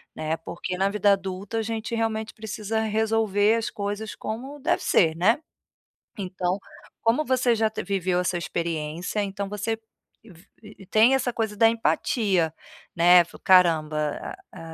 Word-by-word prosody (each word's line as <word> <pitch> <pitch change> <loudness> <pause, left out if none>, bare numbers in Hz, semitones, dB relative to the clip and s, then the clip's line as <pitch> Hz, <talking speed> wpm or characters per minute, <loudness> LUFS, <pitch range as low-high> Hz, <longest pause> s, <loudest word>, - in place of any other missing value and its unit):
né. 155 +1 -2
Por 165 +1 -10
que 180 - -3
na 190 +1 +2
vida 205 0 +3
adulta 195 +2 -2
a - - +1
gente 225 +1 -4
realmente 225 -1 -2
precisa 220 0 -4
resolver 220 -1 +2
as 225 - -2
coisas 205 +1 -4
como 265 +7 -6
deve - - +1
ser, 160 -3 +3
né. 215 - +3 0.8
Então, 185 -1 -2 0.4
como 230 +7 +2
você 255 -3 +2
já 220 -1 +1
te 220 - -5
viveu 185 -2 0
essa 180 0 -1
experiência, 170 +3 -3
então 200 0 -4
você 210 +2 -3 0.8
vi 210 -2 -13
tem 225 +5 +5
essa 255 -2 0
coisa 220 -2 -2
da 225 +2 +6
empatia, 205 -6 +1 0.4
né: 175 +1 +6 0.2
"Caramba, 155 - +2 0.2
a - - -11
205 Hz, 145 wpm, -25 LUFS, 180-225 Hz, 0.8 s, da